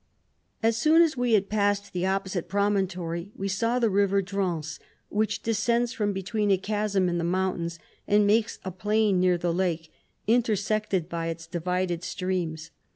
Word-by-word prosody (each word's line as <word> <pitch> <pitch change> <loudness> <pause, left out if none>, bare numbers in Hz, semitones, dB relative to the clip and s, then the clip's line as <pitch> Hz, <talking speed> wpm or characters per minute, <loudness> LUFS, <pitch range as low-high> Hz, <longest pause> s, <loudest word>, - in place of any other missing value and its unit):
As 225 0 +3
soon 315 +7 +5
as 320 -3 +1
we 245 -2 +1
had 200 -2 +3
passed 205 -1 0
the 180 +1 -1
op 195 +1 0
posite 185 -3 -4
promontory, 190 -3 -1
we 195 - -3
saw 230 +5 0
the 240 -2 +2
river 200 0 +3
Drance, 180 -5 -3 0.3
which 210 0 -1
descends 235 +2 +1
from 205 -2 0
between 205 +2 -1
a 195 - +4
chasm 200 -1 0
in 175 -1 0
the - - -1
mountains, 175 -1 -1 0.3
and 205 0 +4
makes 220 +2 +2
a 190 - -3
plain 205 +1 +1
near 180 -1 +3
the 170 0 -1
lake, 170 -3 -1 0.3
intersected 215 -5 +1
by 170 -1 -3
its 165 0 -5
divided 175 +1 -2
streams. 170 -3 -3
195 Hz, 165 wpm, -26 LUFS, 175-210 Hz, 0.3 s, soon